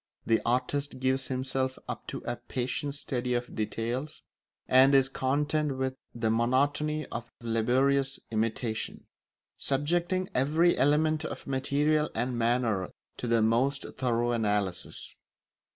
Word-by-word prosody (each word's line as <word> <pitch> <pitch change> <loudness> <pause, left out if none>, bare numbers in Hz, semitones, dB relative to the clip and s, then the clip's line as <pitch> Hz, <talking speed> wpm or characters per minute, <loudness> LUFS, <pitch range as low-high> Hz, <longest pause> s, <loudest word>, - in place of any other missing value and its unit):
The 115 - +3
artist 130 +3 0
gives 130 0 +1
himself 130 0 -1
up - - -6
to - - -5
a 120 0 -2
patient 130 +4 -3
study 125 -3 -2
of 120 0 -3
details, 120 +7 -3 0.4
and 135 +2 +6
is 135 -1 +5
content 145 +2 0
with 130 0 -1 0.2
the 115 -2 +1
monotony 145 +6 +1
of 115 0 -5
laborious 130 +4 +2
imitation; 110 0 -2 0.5
subjecting 175 +6 0
every 155 +7 +3
element 155 +3 +3
of - - -6
material 145 +3 +1
and 125 +2 -1
manner 115 -5 +1 0.3
to 125 - -4
the 115 -1 +3
most 130 +5 +2
thorough 120 -2 +1
analysis. 105 -5 -1
130 Hz, 120 wpm, -29 LUFS, 120-145 Hz, 0.5 s, and